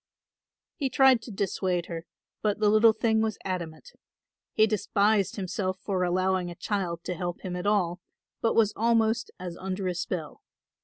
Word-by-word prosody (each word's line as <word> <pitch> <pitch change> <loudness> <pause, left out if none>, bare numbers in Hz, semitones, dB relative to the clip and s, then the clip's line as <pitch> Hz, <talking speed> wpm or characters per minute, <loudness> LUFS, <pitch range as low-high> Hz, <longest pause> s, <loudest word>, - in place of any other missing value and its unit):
He 275 -4 -1
tried 260 -2 +5
to 230 - -9
dissuade 185 -3 -1
her, 165 0 -7 0.3
but 210 -2 +1
the 215 -1 +3
little 220 +1 +6
thing 220 0 +1
was 220 -2 -1
adamant. 180 - -5 0.6
He 215 - +4
despised 205 -1 +1
himself 185 -1 -2
for 190 -1 -2
allowing 185 0 +1
a 175 - -8
child 175 -4 -3
to - - -3
help 175 0 -4
him 180 -1 -4
at 180 +2 -3
all, 180 -4 +1 0.4
but 225 - +1
was 215 -2 +4
almost 225 0 +2
as 180 -2 -6
under 190 0 -3
a 180 - 0
spell. 170 -3 -4
195 Hz, 165 wpm, -27 LUFS, 180-220 Hz, 0.6 s, little